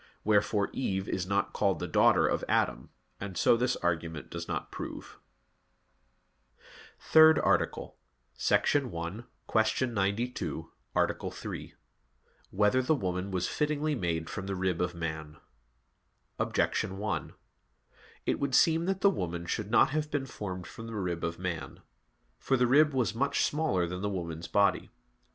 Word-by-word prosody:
Wherefore 105 -1 +2
Eve 95 -7 -2
is 90 -1 -2
not 100 +1 0
called - - +1
the - - -4
daughter - - +4
of - - 0
Adam; 65 - +1 0.3
and 95 -3 -6
so - - +5
this 125 +2 +1
argument 80 -3 -3
does 85 0 -5
not - - -4
prove. - - -8 1.4
_______________________ - - -34 0.4
THIRD 160 0 +7
ARTICLE - - 0 0.6
[I, - - +8
Q. 110 +1 -1
92, 100 - -2 0.2
Art. - - 0
3] - - -7 0.8
Whether 105 +6 +3
the 140 +5 +2
Woman 90 -4 -2
Was 90 -2 -1
Fittingly 150 0 0
Made 85 - -2
from 95 +1 -5
the 100 - -2
Rib 90 -2 -1
of 90 -1 -1
Man? 80 -2 -5 1.0
Objection 95 - 0
1: 105 +1 -3 0.9
It - - 0
would 140 -2 0
seem 165 0 +4
that 190 0 -1
the 200 - +5
woman 85 - -4
should 105 +3 -3
not 120 +3 +4
have 150 0 -1
been 145 -2 -1
formed 95 -7 -6
from 115 - -9
the 115 - -6
rib 90 -4 -2
of 85 0 -2
man. 90 -3 -5 0.6
For 135 - +1
the 125 - +3
rib 150 +5 +5
was 125 -4 +1
much 135 +5 +1
smaller 150 - +1
than 90 +2 -5
the 105 - -1
woman's 85 -4 -4
body. 100 -1 +2
100 Hz, 150 wpm, -30 LUFS, 85-130 Hz, 1.4 s, I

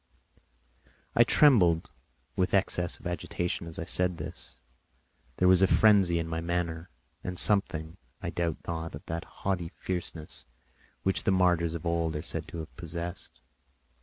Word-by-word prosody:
I - - +7
trembled 90 - +4 0.4
with 95 +1 +1
excess 90 -2 +1
of - - -18
agitation 90 0 -3
as 80 - -5
I 80 - -4
said 90 0 +2
this; - - -8 0.8
there 90 - +3
was 95 0 +6
a 95 - +6
frenzy 100 -5 +5
in 85 -1 -2
my 80 0 -3
manner, 85 -1 -2 0.3
and 90 0 -5
something, 85 -6 +2 0.2
I - - -4
doubt 85 -3 -1
not, 80 -2 -4
of 70 - -11
that 80 +1 -4 0.2
haughty 90 -4 0
fierceness 85 -3 -6 0.6
which 95 - 0
the - - +3
martyrs 90 -3 +2
of 85 - -6
old 85 -1 0
are 75 - -3
said 80 -2 -4
to 80 - -8
have 80 - -11
possessed. 85 +2 -7
85 Hz, 155 wpm, -29 LUFS, 80-90 Hz, 0.8 s, I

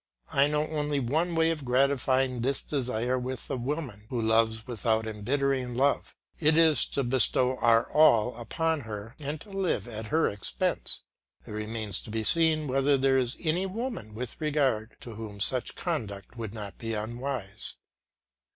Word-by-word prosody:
I 140 +1 +5
know 150 0 +1
only 150 -2 -1
one 160 +7 0
way 165 0 +3
of 155 -3 -4
gratifying 130 -1 +2
this 135 +2 0
desire 125 -2 -1
with 130 +1 -5
the 135 - -2
woman 125 -5 -4
one 115 -3 -1
loves 110 0 +2
without 110 -2 0
embittering 125 +3 -1
love; 140 +3 +1 0.2
it 155 0 +4
is 160 -5 +5
to 140 - +2
bestow 125 +1 +2
our 115 -1 +4
all 125 -6 +5
upon 160 +7 -1
her 110 +1 -7
and 145 +1 -4
to 205 - -13
live 185 - -1
at 110 -2 -6
her 160 +5 +2
expense. 100 -1 -2 0.4
It - - -10
remains 105 0 -3
to - - -12
be 110 +1 -2
seen 160 +3 +4
whether 135 +2 +3
there 135 0 +3
is 125 -1 -1
any 175 +3 +1
woman 195 - -5
with 125 +4 -6
regard 135 -8 0
to 120 -5 -8
whom 105 -2 -8
such 125 +5 +1
conduct 110 - -4
would 115 -4 -5
not 100 -4 -7
be 115 -1 -3
unwise. 110 -2 -4
125 Hz, 165 wpm, -28 LUFS, 110-150 Hz, 0.4 s, I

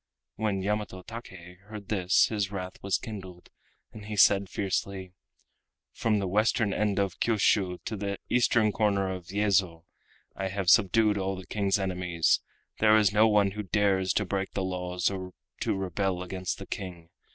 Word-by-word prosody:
When 105 -3 -1
Yamato 105 -2 -2
Take 90 -6 -10
heard 105 -2 -9
this 95 -3 +3
his 105 -3 -2
wrath 95 -2 -6
was 100 0 +1
kindled, 95 -5 -9 0.4
and 105 -1 -11
he 105 - -4
said 100 -1 +5
fiercely: 95 -1 -3 0.8
"From 110 -2 +1
the 100 -2 -1
western 105 +1 +1
end 105 -1 0
of 100 -1 -1
Kiushiu 100 -5 +2
to 110 - -3
the 100 -1 -3
eastern 120 -3 +3
corner 100 -3 +1
of 90 -2 -8
Yezo 95 -4 +1 0.5
I 95 - -3
have 95 -2 +1
subdued 105 0 +4
all 95 0 -1
the 95 0 -9
King's 100 -1 0
enemies—there 95 +3 +1
is 105 -2 +3
no 110 +2 +5
one 105 -2 +3
who 105 +2 -5
dares 95 -1 +1
to 105 - 0
break 95 0 -3
the 95 - -2
laws 90 -1 -1
or 95 -1 -6 0.3
to - - -1
rebel 95 0 -2
against 90 0 -4
the 95 - -8
King. 90 -4 -7
95 Hz, 165 wpm, -28 LUFS, 95-105 Hz, 0.8 s, said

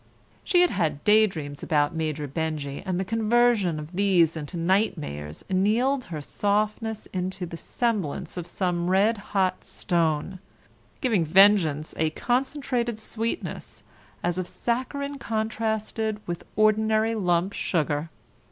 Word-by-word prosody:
She 355 -2 +4
had 355 - +4
had 155 -7 -1
daydreams 185 -10 +2
about 145 0 +1
Major 155 -2 -2
Benjy 145 -1 -3
and 185 -1 0
the 190 - -1
conversion 225 -5 +2
of 150 +4 -9
these 180 -5 +3
into 160 +3 -5
nightmares 165 - -1
annealed 230 +8 +2
her 155 -3 -6
softness 210 - -1
into 185 0 -3
the 170 - -7
semblance 205 - -2
of 175 -2 -5
some 175 -1 -1
red 200 +4 +3 0.2
hot 185 -1 +1
stone, 170 +1 -1 0.6
giving 225 - +2
vengeance 165 -3 +4
a 160 0 +2
concentrated 245 - -1
sweetness 225 +6 -4 0.4
as 175 +1 0
of 180 - -3
saccharine 280 +4 -2
contrasted 220 -1 -2
with 170 -1 -5
ordinary 215 +1 +3
lump 180 -2 +1
sugar. 155 -2 -1
190 Hz, 125 wpm, -26 LUFS, 165-220 Hz, 0.6 s, She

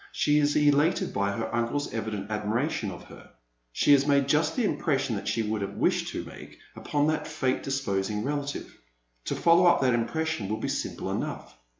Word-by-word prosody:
She 150 - +2
is 145 0 +2
elated 150 +2 +3
by 100 0 0
her 115 +2 -4
uncle's 120 +5 -1
evident 110 -2 -4
admiration 105 +3 -1
of 90 - -9
her. - - -14 0.4
She 145 - +2
has 140 0 +5
made 140 -1 +3
just 150 +2 +2
the 245 - +1
impression 135 - 0
that 100 - -5
she 115 - 0
would 110 0 -2
have 100 0 -4
wished - - +1
to - - -5
make - - -12 0.2
upon 145 0 0
that 155 0 0
fate 140 -4 -1
disposing 105 -6 -2
relative. 145 0 -4 0.5
To - - -2
follow 170 +1 +5
up 175 - +5
that 130 -2 +3
impression 120 -1 -1
will 110 - -1
be 110 - -3
simple - - -3
enough. - - -4
135 Hz, 190 wpm, -27 LUFS, 110-150 Hz, 0.5 s, has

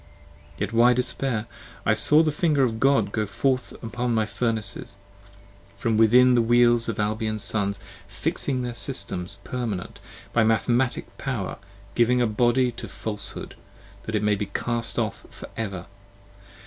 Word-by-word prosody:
10 - - -2
Yet - - -12
why 120 +2 +6
despair? 125 -2 -1 0.4
I 110 - +4
saw 150 +9 +5
the 155 - +1
finger 150 -2 +2
of 110 -3 0
God 135 -7 +3
go 110 -1 -1
forth 125 +5 0
Upon 120 +1 -2
my 110 -1 +2
Furnaces, 105 -2 -3 0.8
from 115 +2 0
within 125 +3 +6
the 120 - +4
Wheels 120 0 +4
of 110 - -3
Albion's 110 0 -1
Sons; 100 -2 -1 0.3
Fixing 130 -2 -2
their 120 -1 -3
Systems, 100 -6 -3
permanent: 115 -8 -4 0.3
by 115 - +4
mathematic 120 +3 0
power 120 -9 -3 0.3
Giving 125 +1 +3
a 120 - +3
body 120 +3 +2
to 115 - -8
Falshood 105 -2 -6 0.5
that 110 - -2
it 105 - 0
may 105 0 +3
be 100 0 -2
cast 115 +3 -2
off - - -2
for - - -10
ever. 100 -5 -4
115 Hz, 150 wpm, -25 LUFS, 105-125 Hz, 0.8 s, why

